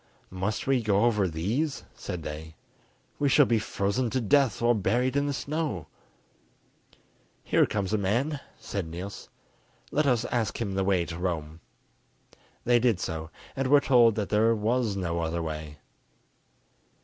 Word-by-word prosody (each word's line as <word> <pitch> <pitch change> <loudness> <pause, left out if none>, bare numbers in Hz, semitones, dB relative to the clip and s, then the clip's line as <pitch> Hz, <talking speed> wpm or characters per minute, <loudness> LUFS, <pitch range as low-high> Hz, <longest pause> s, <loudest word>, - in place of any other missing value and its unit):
"Must 95 +4 -2
we 135 -2 +2
go 105 0 +2
over 105 -5 +2
these?" 110 - -2
said 85 -3 -6
they. 80 +1 -7 0.6
"We 145 - +2
shall 145 +1 +6
be 115 -2 +2
frozen 105 +4 -1
to 130 - 0
death 130 +3 +3
or 120 +1 +4
buried 120 +5 +1
in 140 0 +1
the - - 0
snow." 140 - -3 1.6
"Here - - +3
comes 100 -1 -2
a 110 - +2
man," 125 +10 0 0.2
said 100 -5 -4
Niels; 90 +5 -7 0.6
"let 150 0 +2
us 120 -3 +2
ask 115 -3 -1
him 100 -4 -2
the 95 0 0
way 95 -3 +2
to 85 0 -6
Rome." 80 -3 -3 1.0
They 120 0 +4
did 115 -6 +2
so, 80 -3 -4 0.3
and 135 0 -1
were 145 +2 +6
told 120 -6 +5
that 105 -3 -2
there 110 +2 +3
was 110 0 0
no 85 -3 -2
other 85 0 -2
way. 75 -1 -6
105 Hz, 155 wpm, -27 LUFS, 90-125 Hz, 1.6 s, shall